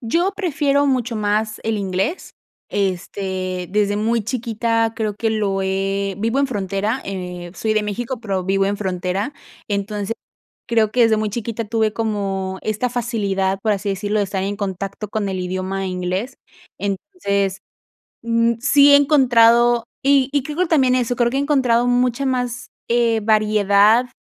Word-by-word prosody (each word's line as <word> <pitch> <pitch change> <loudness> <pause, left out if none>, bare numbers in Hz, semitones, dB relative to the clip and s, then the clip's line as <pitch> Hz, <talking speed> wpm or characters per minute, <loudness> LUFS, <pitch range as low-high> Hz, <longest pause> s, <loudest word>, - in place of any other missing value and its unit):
Yo 340 - 0
prefiero 290 -6 +1
mucho 250 -3 0
más 215 +1 -1
el 225 -1 0
inglés, 195 - -2 0.3
este, 185 -1 -2
desde 205 0 +1
muy 225 +1 0
chiquita 230 -1 0
creo 215 -2 -2
que 225 +2 -1
lo 200 -3 0
he 195 +1 -1
vivo 230 +5 0
en 280 - +3
frontera, 205 +1 -2
eh, 180 -2 -6
soy 215 +1 -1
de 215 - +2
México, 235 +4 -4
pero 195 -5 -2
vivo 195 +1 +1
en 200 +1 -1
frontera. 190 +4 -2 0.4
Entonces, 205 +1 -2 0.5
creo 225 -2 +2
que 250 - +2
desde 225 -1 +3
muy 215 0 -1
chiquita 230 +1 -4
tuve 220 0 0
como 195 -4 -2
esta 215 +4 -1
facilidad, 200 -6 -1
por 220 - +1
así 200 0 -3
decirlo, 205 +2 -1
de 205 - +1
estar 190 0 -3
en 200 +1 -2
contacto 195 +1 -4
con 205 -2 -2
el 190 -1 -3
idioma 185 +1 -3
inglés. 185 +7 -3 0.4
Entonces, 200 - -2 0.6
mm, 230 0 +2
sí 280 +2 +6
he - - +10
encontrado, 240 -4 +4 0.2
y 275 -1 +4
y 285 -1 +1
creo 295 +4 -7
que 365 - +3
también 270 -6 +3
eso, 245 -1 0
creo 240 0 +2
que 265 - -2
he - - +1
encontrado 260 -5 +2
mucha 245 +2 +1
más, 250 -1 -2 0.2
eh, 235 -1 +2
variedad 215 +1 +4
215 Hz, 160 wpm, -20 LUFS, 195-240 Hz, 0.6 s, he